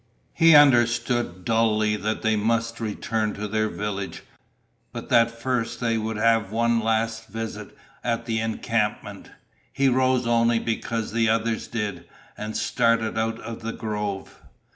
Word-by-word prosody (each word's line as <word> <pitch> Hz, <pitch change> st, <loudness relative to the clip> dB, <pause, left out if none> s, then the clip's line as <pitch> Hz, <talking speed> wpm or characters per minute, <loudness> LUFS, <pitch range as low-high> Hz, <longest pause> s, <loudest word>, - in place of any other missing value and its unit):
He 165 Hz, -1 st, +6 dB
understood 120 Hz, -8 st, +3 dB
dully 110 Hz, -2 st, +2 dB
that 110 Hz, +1 st, -3 dB
they 110 Hz, 0 st, +2 dB
must 115 Hz, +2 st, 0 dB
return 110 Hz, 0 st, -2 dB
to 105 Hz, +1 st, -4 dB
their 110 Hz, +1 st, 0 dB
village, 100 Hz, -2 st, -5 dB, 0.7 s
but -, -, -8 dB
that 115 Hz, 0 st, +5 dB
first 115 Hz, -1 st, -3 dB
they 115 Hz, -2 st, 0 dB
would 110 Hz, 0 st, -2 dB
have 115 Hz, -2 st, +2 dB
one 115 Hz, +1 st, +2 dB
last 115 Hz, 0 st, -1 dB
visit 115 Hz, +1 st, -7 dB, 0.3 s
at 115 Hz, -1 st, -1 dB
the 115 Hz, -2 st, -1 dB
encampment. 110 Hz, -1 st, -2 dB, 0.4 s
He 135 Hz, 0 st, +2 dB
rose 130 Hz, 0 st, +2 dB
only 115 Hz, 0 st, +3 dB
because 115 Hz, 0 st, -2 dB
the 115 Hz, 0 st, +2 dB
others 115 Hz, 0 st, 0 dB
did, 100 Hz, -7 st, -4 dB, 0.3 s
and 105 Hz, +1 st, -5 dB
started 115 Hz, -1 st, +1 dB
out 115 Hz, 0 st, -1 dB
of 115 Hz, +1 st, -7 dB
the 115 Hz, +1 st, -4 dB
grove. 105 Hz, -3 st, -5 dB
115 Hz, 140 wpm, -24 LUFS, 110-115 Hz, 0.7 s, He